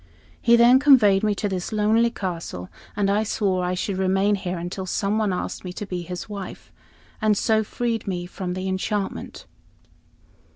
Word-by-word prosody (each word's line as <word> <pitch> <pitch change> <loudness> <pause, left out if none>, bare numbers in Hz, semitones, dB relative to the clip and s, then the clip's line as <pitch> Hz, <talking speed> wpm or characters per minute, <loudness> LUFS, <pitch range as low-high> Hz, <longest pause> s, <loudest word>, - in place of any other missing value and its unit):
He 235 0 +5
then 240 +2 +6
conveyed 240 -9 +6
me 210 -1 +1
to 205 - -2
this 185 0 -3
lonely 220 +2 +3
castle, 170 - -5 0.2
and 205 +1 +1
swore 190 -4 0
I 180 +1 -1
should 190 +1 -2
remain 190 +2 +2
here 185 -2 -2
until 180 +2 -5
some 200 +4 0
one 210 -3 +1
asked 180 - -4
me 180 - -5
to 205 - -5
be 180 -2 -4
his 180 +1 -6
wife, 200 -3 -8 0.5
and 215 -1 +3
so 220 +1 +2
freed 230 0 -3
me 175 -2 -2
from 180 0 -5
the 185 +1 -3
enchantment." 195 +2 -3
195 Hz, 170 wpm, -23 LUFS, 185-215 Hz, 0.5 s, then